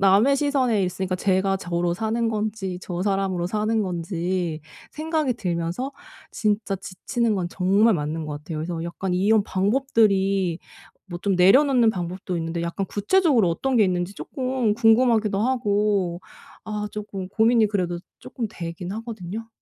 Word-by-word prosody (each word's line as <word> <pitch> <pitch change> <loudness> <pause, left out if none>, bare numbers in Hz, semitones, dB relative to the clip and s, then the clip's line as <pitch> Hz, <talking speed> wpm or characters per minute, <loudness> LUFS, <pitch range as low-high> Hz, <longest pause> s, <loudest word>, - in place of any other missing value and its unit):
남의 200 +8 +5
시선에 260 -7 +1
있으니까 185 0 -2
제가 190 +1 +1
저로 175 -2 -1
사는 225 +4 -1
건지 210 -4 -3
저 175 -1 -4
사람으로 195 -3 0
사는 215 +3 0
건지 175 -2 -2 0.3
생각이 310 -4 -1
들면서 180 +6 -3 0.4
진짜 210 -2 0
지치는 215 +5 -2
건 175 -2 -2
정말 200 +5 +3
맞는 155 0 -3
것 150 -1 -5
같아요. 155 +1 -6
그래서 165 +1 -3
약간 180 +2 -3
이런 205 +4 +3
방법들이 195 -4 +1 0.5
뭐 175 -1 -6
좀 195 -3 +1
내려놓는 245 +5 +5
방법도 180 -1 -4
있는데 165 +1 -3
약간 170 +4 -2
구체적으로 245 - +2
어떤 260 +10 0
게 215 - +6
있는지 180 +1 -1
쪼끔 255 -4 -1
궁금하기도 225 -2 +3
하고 205 -7 +1 0.4
아 210 -1 -3
쪼끔 205 -3 -6
고민이 225 +2 +3
그래도 180 -4 -1 0.2
쪼끔 235 - -5
되긴 175 -1 -6
하거든요. 220 0 -6
195 Hz, 330 characters per minute, -24 LUFS, 180-225 Hz, 0.5 s, 게